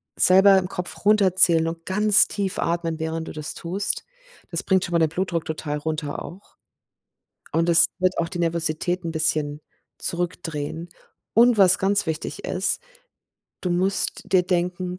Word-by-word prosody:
selber 190 +1 +6
im 180 - -5
Kopf 180 +1 -7
runterzählen 185 -5 +4
und 165 0 -7
ganz 210 +2 +5
tief 195 -2 -4
atmen, 165 -1 -2
während 160 0 -4
du - - -7
das 150 -2 -3
tust, 190 +4 -3 0.5
das - - -1
bringt 190 -2 +1
schon - - -9
mal 170 - +2
den 160 -1 +2
Blutdruck 170 0 -3
total 150 -1 -5
runter 155 -1 -5
auch, 190 +4 -14 0.9
und 165 +1 0
es 165 0 +8
wird 185 0 0
auch 170 0 -2
die 175 -1 -7
Nervosität 170 +1 -1
'n 165 - -4
bisschen 155 -2 0 0.4
zurückdrehen. 170 -2 -4 0.4
Und 235 +1 +4
was 190 -2 +5
ganz 200 +1 +1
wichtig 160 0 -5
ist: 190 - -1 0.8
Du 180 - -2
musst 190 +3 +1
dir 185 -2 +3
denken: 180 0 -3
175 Hz, 155 wpm, -22 LUFS, 160-190 Hz, 0.9 s, es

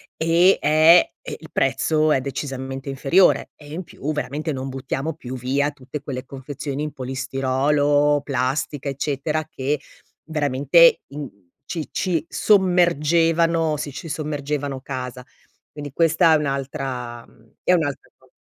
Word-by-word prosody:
E 170 +4 +4
è 155 +3 +6
il - - -8
prezzo 155 -1 +1
è 135 - +3
decisamente 135 0 -5
inferiore 140 +7 +3
e 145 0 -12
in 180 - -4
più 155 -3 -5
veramente 150 +1 -3
non 135 0 -4
buttiamo 135 +3 -3
più 130 -4 -7
via 140 +4 0
tutte 135 +1 -8
quelle 130 -2 -5
confezioni 140 +1 -5
in 150 - -3
polistirolo, 135 +3 +1
plastica, 140 +2 -2
eccetera, 145 +3 -2
che 140 +2 -2 0.4
veramente 150 +1 +4
in 145 +1 -6 0.4
ci 160 +1 -5
ci 170 -5 -1
sommergevano 165 -4 +3
sì, 145 0 -4
ci 160 +4 -8
sommergevano 145 -2 -3
casa. 125 -2 -6 0.5
Quindi 145 -1 -8
questa 165 +2 +4
è - - +6
un'altra 135 -4 -4 0.4
è 180 - +3
un'altra 145 -5 -1
co - - -27
145 Hz, 125 wpm, -22 LUFS, 135-155 Hz, 0.5 s, è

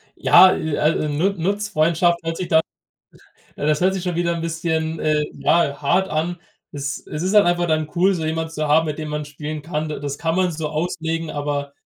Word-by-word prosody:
Ja, 185 - +7
äh, 155 -2 -2
al 155 +2 +2
äh, 150 - -2
Nu 155 +7 +1
Nutzfreundschaft 175 -3 +1
hört 165 0 -3
sich 185 - -4
dann 160 0 +4 1.0
das 150 +1 +1
hört 185 +1 +2
sich 190 -2 -4
schon 180 -2 -2
wieder 170 0 0
'n 165 - -4
bisschen, 160 -1 -2
äh, 155 -1 +1
ja, 150 -4 +1
hart 180 +6 +1
an. 165 +3 -1 0.4
Es 145 0 -5
es 150 - -5
ist 190 +2 0
halt 210 -1 +6
einfach 175 0 +1
dann 155 -1 0
cool, 185 +3 +3
so 165 -4 -3
jemanden 160 +1 -2
zu 155 -1 -2
haben, 155 +2 +4
mit 150 -2 -4
dem 155 -1 -5
man 150 0 -3
spielen 150 +1 -6
kann. 155 0 -3
Da 150 - -5
das 140 0 -4
kann 165 0 -1
man 185 -1 +1
so 160 -1 -3
auslegen, 165 0 -3
aber 145 -1 -3
160 Hz, 220 wpm, -21 LUFS, 150-175 Hz, 1.0 s, Ja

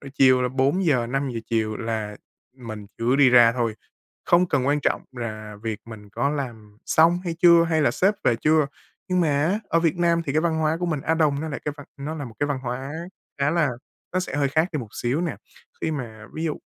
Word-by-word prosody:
rồi 140 - -10
chiều 130 -2 +5
là 125 - +1
4:00-5:00 135 -3 0
chiều 110 -2 -1
là 110 -2 -3 0.4
mình 110 -4 -8
cứ 120 +3 +2
đi 140 -2 +6
ra 120 -2 +7
thôi, 115 -2 -1 0.5
không 175 +1 +4
cần 130 -6 0
quan 145 +1 +2
trọng - - 0
rà 110 -3 -6
việc 110 0 -5
mình 110 -3 -11
có 140 +6 0
làm 115 -8 -6
xong 165 +2 +4
hay 170 -2 -2
chưa 170 -1 +7
hay 160 -2 +1
là 145 - +4
sếp 195 +3 +2
về 120 - +3
chưa. 155 +4 +3 0.4
Nhưng 180 -1 +2
mà 165 - +2 0.2
á, 190 +6 +1
ở 165 - +2
Việt 165 +1 +1
Nam 170 -1 +2
thì 140 - -1
cái 155 - +2
văn 165 -1 0
hóa 155 0 +1
của 175 - 0
mình 160 -4 -1
Á 160 - 0
Đông 150 -3 +2
nó 160 - -4
lại 140 - -5
cái 150 - -2
văn 145 - -11
nó 145 +3 -4
là 150 -3 -5
một 115 -3 -10
cái 145 - +1
văn 145 -2 -1
hóa 130 +3 -4 0.5
khá 140 - +3
là 165 -3 +2 0.4
nó 185 - +1
sẽ 180 - -4
hơi 140 -1 +2
khác 160 +5 +1
đi 155 - -1
một 120 -5 -6
xíu 125 +6 -1
nè. 175 -2 -2 0.4
Khi - - -1
mà 115 -7 -6
ví 160 - -3
dụ 155 -3 -1
140 Hz, 235 wpm, -24 LUFS, 120-160 Hz, 0.5 s, ra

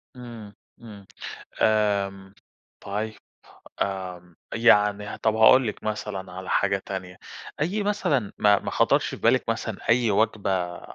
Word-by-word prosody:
إمم، 115 -4 -10 0.3
إمم، 105 -4 -12 0.6
آمم 100 -2 +1 0.5
طيب. 105 +2 -4 0.7
آمم، 90 -3 -5 0.2
يعني 105 -3 +4
ه 100 - -6
طب 110 -1 0
هاقول 115 +3 +6
لِك 105 - -6
مثلًا 105 -3 -4
على 95 +1 -7
حاجة 100 -1 +1
تانية، 95 -2 -6 0.4
أي 190 +8 0
مثلًا 150 - 0
ما 105 -1 +5
ما - - -5
خطرش - - +2
في - - -6
بالك - - +2
مثلًا - - -2
أي 115 -1 +3
وجبة 95 -4 0
105 Hz, 130 wpm, -25 LUFS, 95-110 Hz, 0.7 s, هاقول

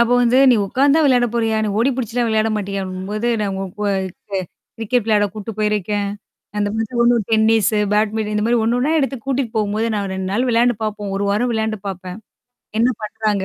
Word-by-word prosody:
அப்போ 235 +1 +3
வந்து 245 +2 +4
"நீ 245 - +5
உட்கார்ந்து 275 +8 +3
தான் 320 - +4
விளையாட 250 -3 +4
போறியா? 225 -2 +1
நீ - - -1
ஓடி 240 +4 +3
பிடிச்சுலாம் 240 -1 -1
விளையாட 220 0 +2
மாட்டியா" 200 -1 -3
அப்டிங்கும் 185 +1 -6
போது, 215 +3 -1
நான் 205 -2 -1
உங்க 190 0 -3 0.2
க 195 -1 -2 0.3
கிரிக்கெட் 230 +1 0
விளையாட 210 -2 +3
கூட்டு 215 +1 -6
போயிருக்கேன். 210 -1 0 0.5
அந்த 205 0 +1
மத்தி 225 +2 -3
ஒண்ணு 240 0 +4
டென்னிஸ, 220 -2 +3 0.2
பேட்மிண்டன் 215 0 0
இந்த 210 0 0
மாரி 240 +1 +3
ஒண்ணு 230 +2 +1
ஒண்ணா 280 +5 +1
எடுத்து 270 -2 0
கூட்டிட்டு 265 -4 -1
போகும்போது 215 +1 0
நான் 200 -2 -2
2 190 0 -3
நாள் 240 +5 +1
விளையாண்டு 240 +1 +3
பார்ப்போம். 210 -2 -3
1 200 - -1
வாரம் 230 +5 +1
விளையாண்டு 220 -1 -1
பாப்பேன். 185 0 -7 0.6
என்ன 235 +3 +4
பண்றாங்க 215 -2 -1
220 Hz, 195 wpm, -19 LUFS, 205-235 Hz, 0.6 s, நீ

